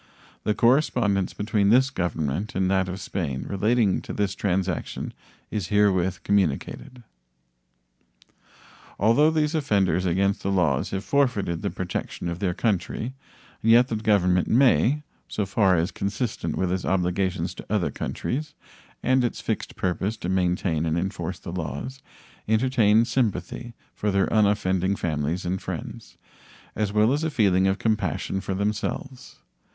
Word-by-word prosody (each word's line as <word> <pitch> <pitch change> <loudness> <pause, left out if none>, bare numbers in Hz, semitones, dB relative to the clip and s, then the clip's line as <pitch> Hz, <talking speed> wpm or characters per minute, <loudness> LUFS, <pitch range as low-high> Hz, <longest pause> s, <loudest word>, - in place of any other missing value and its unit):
The 105 - +1
correspondence 115 -6 +2
between 105 -1 +1
this 130 +4 +4
Government 85 - -2
and 95 0 +1
that 95 -1 +1
of 95 +2 -5
Spain 75 -9 -3
relating 105 +1 +2
to - - -7
this 100 -2 0
transaction 95 -3 -2 0.4
is 100 -5 -2
herewith 95 -4 +2
communicated. 100 - -1 1.9
Although 115 +9 +4
these 155 -1 +1
offenders 100 - +1
against 100 +4 +1
the 100 - -2
laws 80 -8 +1
have 95 0 -3
forfeited 110 -13 +1
the - - -1
protection 90 -1 -4
of 85 +1 -4
their 90 -3 -1
country, 110 +3 -1 0.5
yet 115 +3 +5
the 115 - -1
Government 95 -5 +2
may, 135 +3 +3 0.2
so 105 - -2
far 95 -1 +3
as 85 +3 0
consistent 100 -5 -3
with 95 -1 0
its 95 0 -1
obligations 90 -1 0
to - - -10
other 105 -5 +1
countries 150 +4 -4 0.5
and 130 0 +3
its 120 - -1
fixed - - -3
purpose 95 +4 -1
to 90 - -4
maintain 90 -3 +1
and 80 +1 0
enforce 90 0 -3
the 85 - -8
laws, 90 - -5 0.5
entertain 110 -1 +3
sympathy 115 -1 -2 0.2
for 105 - -2
their 100 -1 +2
unoffending 100 -3 +2
families 80 +1 -2
and 95 +2 -2
friends, - - -7 0.6
as 105 -1 -1
well 105 +4 +3
as 150 +2 -1
a 160 - +1
feeling 95 -8 +3
of 95 +1 +1
compassion 95 -4 -1
for 95 -1 -3
themselves. 105 +6 -3
100 Hz, 140 wpm, -25 LUFS, 90-115 Hz, 1.9 s, yet